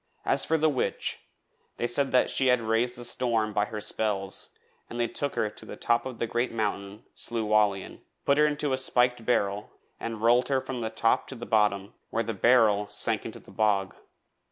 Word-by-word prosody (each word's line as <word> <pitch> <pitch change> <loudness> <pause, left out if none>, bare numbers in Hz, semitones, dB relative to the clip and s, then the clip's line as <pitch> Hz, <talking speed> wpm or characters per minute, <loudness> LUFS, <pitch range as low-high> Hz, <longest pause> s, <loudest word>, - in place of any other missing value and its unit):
As - - +4
for 160 - +2
the 155 0 +2
witch, 140 -4 -2 0.6
they - - -1
said 130 +1 +2
she 135 - +3
had 125 -1 +4
raised 115 +2 0
the 120 - -5
storm 115 -4 0
by 105 0 +1
her 110 0 -6
spells 105 -2 -1 0.4
and 120 - -6
they 120 - +1
took 145 +3 -4
her 110 - 0
to 105 - -10
the - - -9
top 120 +2 0
of 125 -3 -8
the - - -1
great 120 +2 -1
mountain 105 -2 -4
Slieu 115 -2 -3
Whallian, 105 -2 +1 0.2
put 140 +1 +3
her 150 - +5
into 145 -2 -1
a 130 - 0
spiked 125 -2 +2
barrel 105 -3 0 0.3
and 115 -1 -5
rolled 120 +2 +4
her 135 -1 +2
from 130 -1 -5
the 110 - -2
top 115 0 +1
to 135 - -6
the 120 -1 -8
bottom, 105 -2 +1 0.2
where 115 - -1
the 115 0 -3
barrel 105 -1 +3
sank - - 0
into - - -8
the - - -16
bog. 100 -3 0
115 Hz, 200 wpm, -27 LUFS, 105-125 Hz, 0.6 s, her